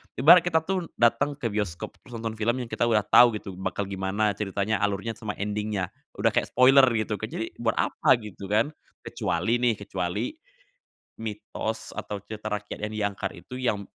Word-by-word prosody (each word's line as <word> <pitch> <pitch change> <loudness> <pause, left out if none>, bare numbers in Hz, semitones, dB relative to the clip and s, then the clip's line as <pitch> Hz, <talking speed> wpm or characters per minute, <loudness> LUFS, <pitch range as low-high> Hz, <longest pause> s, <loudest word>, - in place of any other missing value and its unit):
ibarat 160 +7 +8
kita 160 -2 +1
tuh 185 -1 -2
dateng 120 +5 +2
ke 125 -6 -3
bioskop 100 -5 -3 0.2
nonton 115 -2 -4
film 115 +2 +1
yang 115 - -11
kita 120 - +1
udah 110 -3 +3
tahu 120 +3 +6
gitu 95 -3 -7
bakal 100 - -2
gimana 100 +2 0
ceritanya, 100 +1 -1
alurnya, 100 +2 -1
sama 110 -3 -4
ending-nya. 105 -2 -2 0.2
Udah - - +2
kayak - - +1
spoiler 130 +2 +6
gitu 110 -1 -1
kan, 110 - -3
jadi 115 - -5
buat 115 -1 0
apa - - +3
gitu 100 -2 -8
kan. 110 +8 +2 0.3
Kecuali 105 +8 0
nih, 120 -3 +2
kecuali, 90 - -2 0.9
mitos 110 0 -5
atau 105 - -4
cerita 110 0 -8
rakyat 105 0 -4
yang 105 - -4
diangkat 100 -2 -2 0.2
itu 125 - -8
yang 115 -6 0
110 Hz, 170 wpm, -26 LUFS, 100-120 Hz, 0.9 s, ibarat